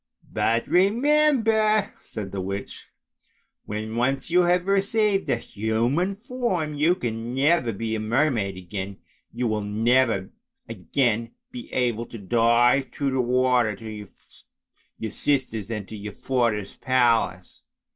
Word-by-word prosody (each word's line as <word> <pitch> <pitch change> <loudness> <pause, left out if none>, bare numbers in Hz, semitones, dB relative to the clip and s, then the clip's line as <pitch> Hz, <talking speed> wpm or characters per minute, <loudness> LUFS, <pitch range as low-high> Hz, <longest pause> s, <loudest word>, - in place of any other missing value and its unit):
" - - -43
But 115 +1 +1
remember," 220 - +3
said 100 -3 -7
the 100 - -3
witch, 100 +1 -6 0.4
" - - -44
when 110 +1 -4
once 135 +6 0
you 180 +1 +5
have 175 +1 +2
received 200 +1 +1
a - - +3
human 120 - -1
form, 215 -9 -2
you 155 +5 +2
can 120 -5 -4
never 140 -3 +2
be 110 +2 -4
a 110 - -1
mermaid 110 -4 0
again, 95 +2 -6 0.3
you 120 +2 -3
will 110 -2 0
never 110 -1 +1 0.4
again 115 +2 -1 0.2
be 245 -1 -9
able 120 -2 -1
to 115 - -9
dive 120 +5 +3
down - - -31
through 140 -2 -1
the 130 -1 +1
water 125 -3 +2
to 110 -2 -8 0.9
your 110 -2 -5
sisters 125 -7 -1
and 105 -4 -4
to 110 - -8
your 105 0 -7
father's 115 -6 -1
palace. 115 -8 +1
120 Hz, 140 wpm, -24 LUFS, 110-160 Hz, 0.9 s, you